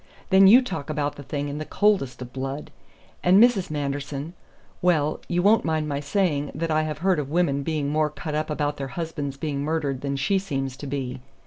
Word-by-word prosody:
Then 190 Hz, 0 st, +7 dB
you 245 Hz, +6 st, +8 dB
talk 150 Hz, -, -5 dB
about 150 Hz, -1 st, -1 dB
the -, -, -9 dB
thing 145 Hz, +1 st, -3 dB
in 145 Hz, +1 st, -4 dB
the -, -, -3 dB
coldest 185 Hz, -10 st, +1 dB
of 125 Hz, 0 st, -12 dB
blood. 135 Hz, +2 st, -5 dB, 0.5 s
And 180 Hz, +2 st, +5 dB
Mrs. 230 Hz, -5 st, +4 dB
Manderson 145 Hz, +1 st, -3 dB, 0.5 s
well, 155 Hz, -4 st, +2 dB
you 175 Hz, 0 st, 0 dB
won't 215 Hz, +3 st, +5 dB
mind 155 Hz, -1 st, 0 dB
my 140 Hz, -1 st, -2 dB
saying 145 Hz, -1 st, 0 dB
that 165 Hz, +2 st, -2 dB
I 155 Hz, 0 st, +3 dB
have 155 Hz, -2 st, -3 dB
heard 185 Hz, -4 st, +3 dB
of 140 Hz, -2 st, -3 dB
women 150 Hz, -4 st, +1 dB
being 150 Hz, -1 st, -1 dB
more 155 Hz, +1 st, +1 dB
cut 150 Hz, +1 st, -6 dB
up 155 Hz, +1 st, -1 dB
about 150 Hz, -1 st, -1 dB
their 135 Hz, -, -4 dB
husbands 150 Hz, -5 st, -4 dB
being 140 Hz, -1 st, -3 dB
murdered 145 Hz, -3 st, -1 dB
than 140 Hz, -1 st, -2 dB
she 165 Hz, +8 st, +1 dB
seems 135 Hz, -8 st, -3 dB
to 145 Hz, -, -7 dB
be. 130 Hz, -2 st, -4 dB
150 Hz, 210 wpm, -25 LUFS, 140-165 Hz, 0.5 s, you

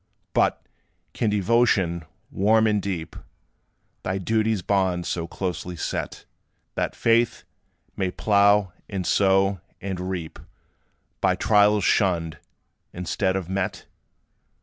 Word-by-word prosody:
But, -, -, +1 dB, 0.5 s
can 115 Hz, -, 0 dB
devotion, 100 Hz, -5 st, +2 dB, 0.3 s
warm 110 Hz, +3 st, +3 dB
and 105 Hz, -2 st, +2 dB
deep, 90 Hz, -5 st, -4 dB, 0.9 s
Thy 95 Hz, +1 st, -2 dB
duty's 110 Hz, 0 st, 0 dB
bounds 95 Hz, -3 st, 0 dB
so 85 Hz, -1 st, -2 dB
closely 90 Hz, 0 st, -4 dB
set, -, -, -4 dB, 0.5 s
That -, -, -2 dB
faith 115 Hz, 0 st, +2 dB, 0.5 s
may 95 Hz, -, -1 dB
plough, 100 Hz, -1 st, +3 dB, 0.2 s
and 95 Hz, -3 st, -3 dB
sow, 95 Hz, -1 st, +2 dB, 0.2 s
and 95 Hz, -2 st, -4 dB
reap 85 Hz, -4 st, -5 dB, 0.8 s
By -, -, +3 dB
trials 105 Hz, -1 st, +3 dB
shunned, 85 Hz, -5 st, +1 dB, 0.5 s
instead 95 Hz, +2 st, -1 dB
of 95 Hz, -3 st, -3 dB
met? 95 Hz, 0 st, -3 dB
95 Hz, 105 wpm, -24 LUFS, 90-105 Hz, 0.9 s, warm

